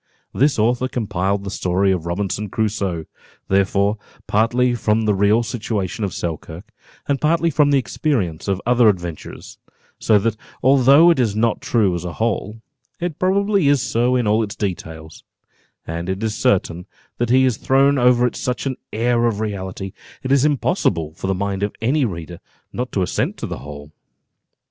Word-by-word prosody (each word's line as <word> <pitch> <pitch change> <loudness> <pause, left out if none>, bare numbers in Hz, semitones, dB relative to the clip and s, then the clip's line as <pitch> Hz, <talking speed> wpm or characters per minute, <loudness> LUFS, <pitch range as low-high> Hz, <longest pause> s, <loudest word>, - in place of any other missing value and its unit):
This 140 +2 +2
author 120 +4 +1
compiled 100 -5 -2
the 100 - -5
story 95 +1 +1
of 85 -3 -2
Robinson 100 +3 -2
Crusoe, 100 -6 -2 0.4
therefore, 100 +2 +1 0.3
partly 120 +4 +2
from 110 -1 +1
the 105 -1 +2
real 105 +4 +3
situation 110 -4 -3
of 100 - -1
Selkirk, 85 +6 -6 0.4
and 140 -1 0
partly 165 +2 +2
from 145 0 +3
the 140 - +4
experience 120 - -2
of 95 -1 0
other 120 -2 +5
adventurers; 85 -5 -5 0.4
so 110 - +4
that 110 +2 0 0.3
although 140 +5 +6
it 165 - +1
is 110 -5 +1
not 115 +2 +1
true 115 -9 +1
as 85 -1 -4
a 90 -1 -5
whole, 110 0 -2 0.4
it 175 -3 -4
probably 195 -2 +2
is 145 -1 +4
so 120 0 +1
in 125 -2 +1
all 105 +2 +2
its 105 -2 -4
details; 80 -5 -6 0.6
and 85 +2 -5
it 95 +3 -3
is 110 -1 -1
certain, 95 -8 0 0.3
that 120 -1 0
he 130 +2 +5
has 125 -4 +1
thrown 135 +1 +3
over 125 0 +4
it 125 - -1
such 125 +2 -3
an 130 -2 -2
air 120 +1 +1
of 110 -3 -2
reality, 95 -2 -5 0.3
it 130 - -2
is 135 -1 +4
impossible 125 - 0
for 90 - -6
the 95 - 0
mind 100 0 -2
of 105 0 -2
any 130 +5 +1
reader 85 -4 -6 0.3
not 125 +1 -4
to 95 - 0
assent 90 - -2
to - - -5
the - - -6
whole." 75 0 -10
110 Hz, 175 wpm, -20 LUFS, 95-125 Hz, 0.6 s, although